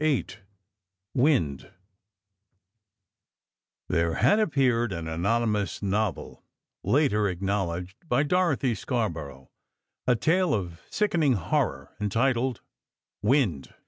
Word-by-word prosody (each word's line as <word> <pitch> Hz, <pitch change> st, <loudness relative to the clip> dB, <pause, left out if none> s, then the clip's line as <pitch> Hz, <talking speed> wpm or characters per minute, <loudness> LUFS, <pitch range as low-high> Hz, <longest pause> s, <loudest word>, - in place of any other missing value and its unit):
VIII 155 Hz, -4 st, +2 dB, 0.9 s
"WIND" 125 Hz, -, +1 dB, 2.2 s
There 85 Hz, 0 st, +1 dB
had 135 Hz, -, +4 dB
appeared 130 Hz, -, +2 dB
an 85 Hz, -3 st, -4 dB
anonymous 105 Hz, +5 st, 0 dB
novel 100 Hz, -2 st, -2 dB, 0.4 s
(later 105 Hz, -8 st, +2 dB
acknowledged 95 Hz, 0 st, -2 dB
by 140 Hz, -, +3 dB
Dorothy 150 Hz, -6 st, +1 dB
Scarborough), 85 Hz, -, -4 dB, 0.6 s
a 125 Hz, -, +4 dB
tale 175 Hz, +7 st, +2 dB
of 85 Hz, -4 st, -5 dB
sickening 170 Hz, -10 st, +2 dB
horror, 95 Hz, -8 st, -1 dB
entitled 120 Hz, +4 st, 0 dB, 0.6 s
"Wind." 105 Hz, -, +1 dB
110 Hz, 85 wpm, -27 LUFS, 90-135 Hz, 2.2 s, had